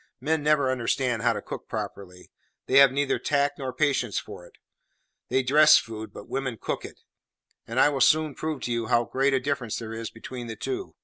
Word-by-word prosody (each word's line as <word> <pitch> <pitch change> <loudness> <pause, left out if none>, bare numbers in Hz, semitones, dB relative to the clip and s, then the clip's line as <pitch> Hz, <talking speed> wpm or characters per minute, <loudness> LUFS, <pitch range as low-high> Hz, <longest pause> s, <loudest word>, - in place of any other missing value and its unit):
Men 155 +4 0
never 145 -3 +2
understand 125 -1 -1
how 120 0 +2
to - - -6
cook - - -8
properly; 90 -2 -7 0.3
they 135 - +5
have 140 -2 +7
neither 140 0 0
tact 145 0 0
nor 130 -2 -3
patience 130 -5 0
for - - -7
it. - - -22 0.7
They 130 - +1
dress 150 +4 +7
food, 110 -1 -5
but - - -11
women 130 -4 -3
cook - - -3
it; - - -11 0.7
and 115 +3 -2
I 145 - +6
will 140 -2 -2
soon 155 +3 +4
prove 155 -1 -4
to 120 - -3
you 115 -1 -1
how 120 +2 +3
great 135 +3 +1
a - - +2
difference 130 -4 -2
there 115 -1 -6
is 115 0 -5
between 120 +1 -8
the 115 - -6
two. 385 - -5
130 Hz, 205 wpm, -26 LUFS, 115-145 Hz, 0.7 s, have